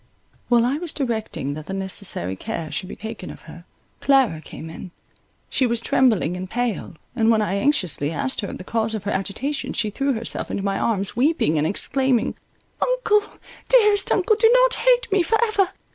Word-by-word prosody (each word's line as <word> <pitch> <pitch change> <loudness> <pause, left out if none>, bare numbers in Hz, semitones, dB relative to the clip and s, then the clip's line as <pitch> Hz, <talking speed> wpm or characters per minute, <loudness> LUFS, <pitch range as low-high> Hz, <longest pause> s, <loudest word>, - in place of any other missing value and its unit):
While 240 -1 +4
I 265 +4 0
was 345 -2 -2
directing 220 - -3
that 155 +1 -8
the 195 - -4
necessary 190 - -3
care 155 - -5
should 155 +5 -3
be - - -7
taken 220 -4 -7
of - - -10
her, 170 0 -13 0.3
Clara 265 - +3
came 160 - -9
in; 165 +3 -9 0.6
she 260 - +1
was 235 -1 +1
trembling 225 -8 +2
and 185 0 -6
pale; 240 -5 -2 0.2
and, 225 -2 +2
when 225 -1 +4
I 200 - -1
anxiously 185 - 0
asked 260 - -1
her 200 - -4
the - - -8
cause 220 +2 -1
of 210 - -5
her 205 - -2
agitation, 220 +10 -2
she 215 -2 0
threw 275 +5 0
herself 225 -1 -3
into 195 - -3
my 195 -1 -1
arms 200 -3 0
weeping 250 - +2
and 150 - +1
exclaiming—"Uncle, 275 - 0 0.5
dearest 420 -5 +4
uncle, 415 +3 +3
do 450 0 +5
not - - +4
hate - - +3
me 390 -1 +4
for 445 +6 +2
ever! 405 -4 +1
230 Hz, 185 wpm, -22 LUFS, 190-285 Hz, 0.6 s, do